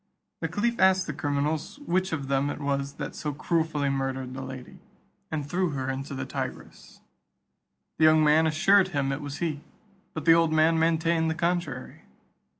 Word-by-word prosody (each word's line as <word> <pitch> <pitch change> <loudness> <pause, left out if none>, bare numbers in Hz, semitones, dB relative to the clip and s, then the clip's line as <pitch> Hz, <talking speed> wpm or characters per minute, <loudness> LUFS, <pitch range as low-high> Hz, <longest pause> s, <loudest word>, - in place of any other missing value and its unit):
The - - -2
caliph 235 +3 -1
asked 190 -1 +4
the 150 - -4
criminals 145 - -2
which 185 -1 0
of 145 -4 -3
them 135 +1 +1
it - - -5
was 140 -1 -2
that - - -6
so 150 -1 -4
cruelly 160 -1 0
murdered 135 -1 -2
the 130 - -6
lady, 130 -1 -9 0.5
and 150 -3 -3
threw 180 +3 0
her 135 -1 -2
into 135 +1 -5
the - - -4
Tigris? - - -7 1.0
The 155 - +6
young 155 0 +6
man 155 +2 +4
assured 190 +5 +4
him 140 -6 -1
it 135 +2 -3
was 145 -1 -6
he, 155 -3 -2 0.5
but 155 - -5
the 165 - +8
old 165 -1 +3
man 160 +1 +3
maintained 165 0 +2
the 160 - -1
contrary. 170 -6 -2
155 Hz, 175 wpm, -27 LUFS, 140-165 Hz, 1.0 s, the